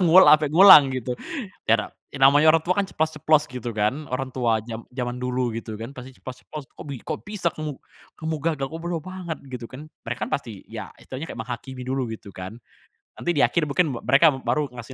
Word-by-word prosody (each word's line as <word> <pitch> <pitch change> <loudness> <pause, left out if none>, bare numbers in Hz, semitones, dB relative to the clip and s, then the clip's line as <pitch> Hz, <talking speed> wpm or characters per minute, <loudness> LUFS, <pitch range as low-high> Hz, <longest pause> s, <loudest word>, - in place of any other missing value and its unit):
nguwol 180 +1 +7
ampe 155 -1 +6
ngulang?" 160 -3 +9
gitu. 130 -1 -3 0.5
Yato 115 0 +1 0.2
ya - - -7
namanya 145 +3 +6
orang 160 0 +2
tua 185 +1 +2
kan 200 - +2
ceplas-ceplos 155 -1 +1
gitu 125 -3 -5
kan. 110 +7 -1
Orang 130 0 -3
tua 115 -3 +2
jam 115 0 -6
jaman 125 -1 -3
dulu 125 -2 -2
gitu 110 -1 -6
kan. 120 +5 -7
Pasti 130 +1 -9
ceplos-ceplos. 135 +3 -9
"Kok - - -9
bi 140 -4 -7
kok - - -5
bisa 205 -4 -3
kamu, 155 -3 -5 0.4
kamu 160 0 -2 0.2
gagal, 140 -3 -3
kok 160 +4 -7
bodoh 175 -1 -2
banget?" 180 -1 -6
gitu 125 -2 -7
kan. 140 +4 -9 0.2
Mereka 115 +1 -3
kan - - -10
pasti 115 -8 -9
ya 110 -3 -7
istilahnya 130 +3 -8
kayak - - -9
menghakimi 125 +2 -6
dulu 130 0 -1
gitu 105 -3 -10
kan. 95 +5 -8 0.6
Nanti 175 - -1
di 145 - +2
akhir 170 0 +3
mungkin 150 -3 0
me - - -6
mereka 150 +4 +6
baru 145 +1 -1
ngasih 120 +2 -8
135 Hz, 210 wpm, -24 LUFS, 120-155 Hz, 0.6 s, ngulang